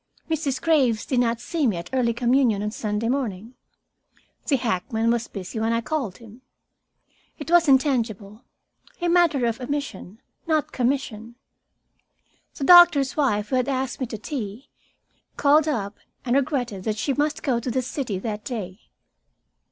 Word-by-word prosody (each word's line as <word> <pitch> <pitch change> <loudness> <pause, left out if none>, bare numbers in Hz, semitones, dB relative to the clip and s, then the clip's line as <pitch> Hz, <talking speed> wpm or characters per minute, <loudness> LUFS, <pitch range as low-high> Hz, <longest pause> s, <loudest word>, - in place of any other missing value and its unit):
Mrs. 280 -4 -1
Graves 260 -10 +2
did 255 - 0
not 235 -1 +1
see 295 +3 -1
me 205 -6 0
at 170 +1 -8
early 250 -3 +2
communion 235 -3 +2
on 210 - -2
Sunday 210 0 -2
morning. 235 -4 -3 0.9
The 285 - +3
hackman 225 -1 0
was 235 0 -1
busy 195 +3 -6
when 225 +1 0
I 230 - 0
called 250 -7 -3
him. 230 +1 -15 1.0
It 310 +1 -7
was 345 -2 +5
intangible, 235 -6 +1 0.6
a 350 - -1
matter 335 -7 +3
of 230 +2 -2
omission, 250 -7 -5 0.3
not 310 -2 0
commission. 240 -3 -2 1.2
The - - -5
doctor's 345 -5 +7
wife, 210 -8 0
who 260 - +1
had 255 +2 0
asked 265 -1 -2
me 255 - -2
to 225 - -6
tea, 220 0 -6 0.7
called 295 +2 +4
up 210 -8 -3 0.3
and 245 0 +1
regretted 250 -8 -1
that 215 -1 -1
she 275 +6 -1
must 295 +2 -1
go 255 -6 +1
to 245 - -4
the 255 +1 -1
city 245 -6 -3
that 210 +2 -5
day. 205 -6 -6
245 Hz, 155 wpm, -24 LUFS, 220-280 Hz, 1.2 s, doctor's